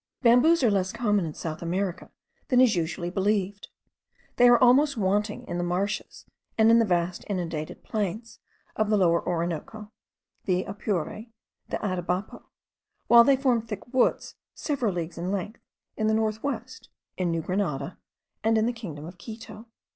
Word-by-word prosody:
Bamboos 260 +7 +5
are 230 - +4
less 190 -2 0
common 210 -5 +1
in 155 - -6
South 155 -2 -5
America 180 +1 -3 0.4
than 250 -3 +3
is 250 -5 +5
usually 175 +1 -2
believed. 200 +1 -1 0.7
They 245 0 +7
are 240 - +7
almost 265 +3 +4
wanting 210 +1 0
in 175 0 -3
the - - -1
marshes 185 +4 -3 0.3
and 220 0 +5
in 230 - +6
the 230 - +3
vast 175 -1 0
inundated 165 -5 -4
plains 215 +2 -4 0.4
of 215 -1 0
the 215 - +3
Lower 170 -3 +3
Orinoco, 175 +5 -4 0.5
the 185 -1 +1
Apure, 200 -4 -2
and 220 +3 -9 0.4
the - - -1
Atabapo, 185 +1 -3 0.6
while 235 0 +9
they 275 +1 +4
form 255 -4 +2
thick 220 +2 -8
woods, 255 - +1 0.2
several 270 -8 -1
leagues 170 -2 -5
in 180 +2 -2
length, 200 +3 -4 0.3
in 215 - 0
the 220 - +3
north 220 0 0
west, 260 -2 -5 0.3
in 185 -2 -1
New 165 -1 -1
Grenada, 170 -5 -2 0.4
and 225 0 +3
in 220 - +2
the 240 - 0
kingdom 165 -11 -8
of 175 +2 -11
Quito. 225 +2 -10
205 Hz, 165 wpm, -26 LUFS, 175-230 Hz, 0.7 s, while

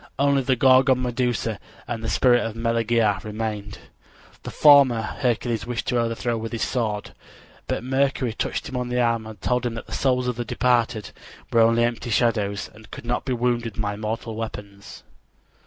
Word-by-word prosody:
Only 140 0 +3
the 130 0 +1
Gorgon 130 +1 +4
Medusa 120 -3 -1 0.3
and 115 -2 -4
the 110 - -2
spirit 120 -2 +3
of 115 -1 -4
Meleager 115 -3 +1
remained. 105 -1 -5 0.6
The - - -7
former 140 -5 +6
Hercules 115 -1 -2
wished 120 -1 -3
to 125 - +1
overthrow 115 0 -1
with 115 +1 -6
his 115 - -1
sword, 110 -5 -2 0.6
but - - -2
Mercury 130 -2 0
touched - - -3
him 130 - -5
on 125 0 -3
the 125 0 0
arm 115 -2 +1
and 110 -2 -10
told 125 +6 0
him 120 -2 -2
that 115 - -7
the - - -15
souls 125 -2 +1
of 125 -2 -2
the 120 - -2
departed 120 -2 0 0.4
were 115 - +5
only 115 +1 +4
empty 120 0 -2
shadow 110 -3 +2
pictures 100 0 -6
and 110 -1 -16
could - - -9
not 120 +1 -2
be 130 - -1
wounded 120 -3 -1
by 105 -1 -1
mortal 110 +1 -4
weapons. 105 -3 -8
115 Hz, 185 wpm, -23 LUFS, 110-125 Hz, 0.6 s, former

